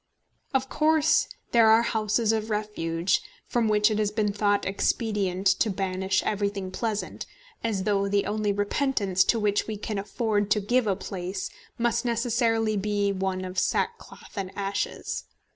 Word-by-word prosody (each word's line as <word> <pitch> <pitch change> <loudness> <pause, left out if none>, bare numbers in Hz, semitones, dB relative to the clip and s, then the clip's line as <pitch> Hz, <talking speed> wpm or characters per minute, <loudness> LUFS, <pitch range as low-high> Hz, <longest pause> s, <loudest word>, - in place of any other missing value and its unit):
Of 265 -1 +1
course 310 +2 +3 0.2
there 230 -2 +6
are 225 +1 +6
houses 220 0 +1
of 220 0 -1
refuge, 190 -5 0 0.2
from 235 -2 +1
which 210 +1 +4
it 215 - 0
has 210 -1 +2
been 210 -1 0
thought 205 0 +1
expedient 195 -1 -1 0.2
to 225 - +3
banish 190 -1 0
everything 200 -2 -2
pleasant, 215 0 -3 0.4
as 210 -5 -1
though 200 -1 +1
the 200 0 +1
only 210 0 0
repentance 205 -2 +1
to 230 - +2
which 205 -1 +1
we 215 -1 -3
can 210 0 -3
afford 205 0 -1
to 210 - +3
give 240 +3 +1
a 195 - +2
place 185 0 -5 0.3
must 235 0 +1
necessarily 230 -2 +1
be 205 0 0
one 190 -1 -2
of 185 0 -2
sackcloth 465 - -2
and 195 -3 -3
ashes. 200 0 -3
210 Hz, 155 wpm, -26 LUFS, 195-225 Hz, 0.4 s, there